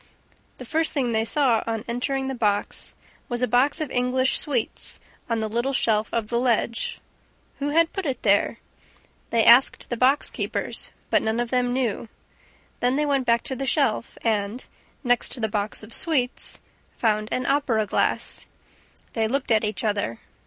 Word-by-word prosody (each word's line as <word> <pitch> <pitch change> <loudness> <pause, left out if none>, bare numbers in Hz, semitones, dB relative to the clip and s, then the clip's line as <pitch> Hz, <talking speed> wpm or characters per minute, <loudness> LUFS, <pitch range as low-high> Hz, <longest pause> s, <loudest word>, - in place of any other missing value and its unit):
The 255 - -9
first 320 +6 0
thing 260 -5 0
they 220 -1 +2
saw, 240 -1 +2
on 225 0 -3
entering 265 +3 -2
the 265 - -2
box, 210 -4 -1 0.3
was 240 0 -1
a - - +3
box 260 +7 +2
of 310 -4 -3
English 255 +1 +1
sweets 255 -6 -1 0.3
on 230 -1 0
the 220 - -1
little 240 +5 -1
shelf 220 -4 +1
of 225 -2 -2
the 235 - +1
ledge. 235 -1 0 0.6
Who 285 +1 -1
had 330 +2 +3
put 390 -5 -3
it 260 -3 -3
there? 205 +2 +3 0.7
They 230 -1 +3
asked 245 +2 +5
the 240 - -1
box 260 +4 +3
keepers, - - -1 0.2
but - - +4
none 220 +1 -1
of 240 -1 -2
them 250 -1 +1
knew. 240 -3 -1 0.7
Then 250 +1 +2
they 300 +1 +1
went 275 -3 0
back 235 0 +3
to 265 - -3
the 270 +1 -4
shelf 245 -5 +1
and, 215 +1 -1 0.4
next 245 -2 +2
to - - -3
the 220 - 0
box 210 0 -2
of 220 +2 -11
sweets, 265 -7 0 0.4
found 215 -2 +1
an 255 - -1
opera 265 -6 +1
glass. 195 - -1 0.7
They 225 -1 +1
looked 265 +2 -1
at 220 -1 +4
each 215 +2 -2
other. 205 - -1
240 Hz, 175 wpm, -24 LUFS, 220-265 Hz, 0.7 s, asked